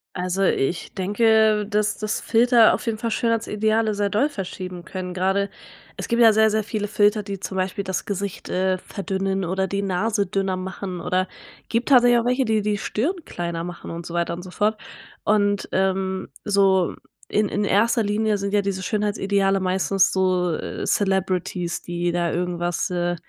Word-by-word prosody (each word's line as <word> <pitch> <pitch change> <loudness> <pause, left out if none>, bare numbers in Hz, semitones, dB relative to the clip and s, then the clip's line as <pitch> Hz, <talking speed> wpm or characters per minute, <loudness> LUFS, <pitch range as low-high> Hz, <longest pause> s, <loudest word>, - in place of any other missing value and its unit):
Also, 185 +2 -1
ich 170 -1 0
denke, 215 +2 +3
dass 210 0 0
dass 215 0 -2
Filter 235 0 +5
auf - - -3
jeden 225 -2 -1
Fall 230 0 -3
Schönheitsideale 220 -1 +1
sehr 205 0 0
doll 215 +8 +2
verschieben 185 - -6
können. 180 +1 -6
Grade 195 +2 0 0.5
es - - -5
gibt 235 0 +2
ja 225 -2 +7
sehr, 220 0 +5
sehr 215 0 0
viele 210 -2 -2
Filter, 210 0 +3
die 195 -1 -6
zum 190 0 -6
Beispiel 185 +1 -1
das 190 -1 -3
Gesicht, 200 -1 -4
äh, 185 0 +1
verdünnen 195 -1 -3
oder 190 +2 -1
die 200 +2 -2
Nase 200 +2 0
dünner 195 -1 -1
machen 185 0 -5
oder 185 +2 0 0.4
gibt 235 +4 0
tatsächlich 245 -3 +6
auch 230 - -2
welche, 250 +2 +2
die 220 -2 +1
die 210 0 0
Stirn 315 - -2
kleiner 170 -1 -4
machen 175 0 -7
und 170 0 -6
so 170 - -7
weiter 170 0 0
und 175 - -6
so 185 - -10
fort. 210 +3 0 0.5
Und, 205 -1 +1
ähm, 190 0 0 0.2
so 195 -3 +3 0.4
in 210 0 +2
in 205 - -1
1. 225 +4 +2
Linie 210 0 +1
sind 200 0 -3
ja 205 - +4
diese 195 -1 -3
Schönheitsideale 200 -2 +1
meistens 190 +1 +2
so, 185 -2 +1
äh, - - -5
Celebrities, 185 -3 0
die 175 0 -2
da 175 -1 0
irgendwas, 175 0 -1
äh 175 -1 -1
195 Hz, 180 wpm, -23 LUFS, 185-215 Hz, 0.5 s, ja